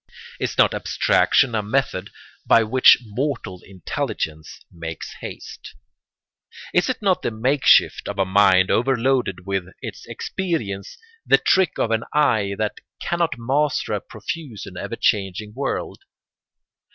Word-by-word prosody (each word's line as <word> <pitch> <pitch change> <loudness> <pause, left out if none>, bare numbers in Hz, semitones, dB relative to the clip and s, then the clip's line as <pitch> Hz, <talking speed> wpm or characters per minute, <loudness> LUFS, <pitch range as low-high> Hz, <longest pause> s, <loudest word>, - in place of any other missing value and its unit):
Is - - -3
not - - +4
abstraction 130 -3 +2
a 110 - +1
method 105 -3 -1 0.3
by 115 - +5
which 125 +4 +6
mortal 110 -5 -4
intelligence 80 -4 -5
makes 80 -1 -7
haste? - - -9 1.0
Is 175 +8 +2
it 250 -4 -3
not 190 -2 +2
the - - -1
makeshift 125 +5 +3
of 100 - -5
a 95 - +2
mind 95 -1 +4
overloaded 125 -6 +1
with 95 -2 -2
its - - -8
experience, 115 - -4 0.3
the - - +5
trick 190 -5 +2
of 115 - 0
an 115 0 +1
eye 110 -10 +2
that 110 -1 -2 0.2
cannot 170 -6 -1
master 135 +1 0
a 105 - -2
profuse 120 - -7
and - - -11
ever - - -5
changing 105 +1 -1
world? 135 +3 -3
110 Hz, 130 wpm, -22 LUFS, 100-135 Hz, 1.0 s, which